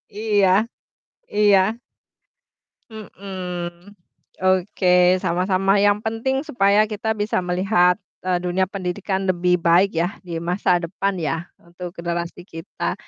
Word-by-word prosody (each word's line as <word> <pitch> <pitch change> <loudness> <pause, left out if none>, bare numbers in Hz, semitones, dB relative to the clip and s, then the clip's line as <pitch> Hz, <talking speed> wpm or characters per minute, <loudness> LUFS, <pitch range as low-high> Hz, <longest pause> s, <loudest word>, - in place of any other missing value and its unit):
iya, 210 -3 +2 0.9
iya. 205 -2 +5 1.3
Mhm, 185 -3 -7 0.5
oke 185 0 +1 0.3
sama-sama, 185 +3 +1
yang 205 0 +4
penting 250 +7 -2
supaya 210 -6 +3
kita 215 +1 -3
bisa 205 -3 0
melihat, 180 0 +2 0.2
eee, 180 -1 0
dunia 180 +1 -1
pendidikan 190 0 -3
lebih 180 -1 +2
baik 175 +4 +4
yah 175 +4 0
di 170 -2 -5
masa 175 +1 +1
depan 190 +3 -3
ya, 165 +2 -3
untuk 175 +1 -9
generasi 170 +1 -4
kita. 165 +1 -5
185 Hz, 110 wpm, -21 LUFS, 175-205 Hz, 1.3 s, iya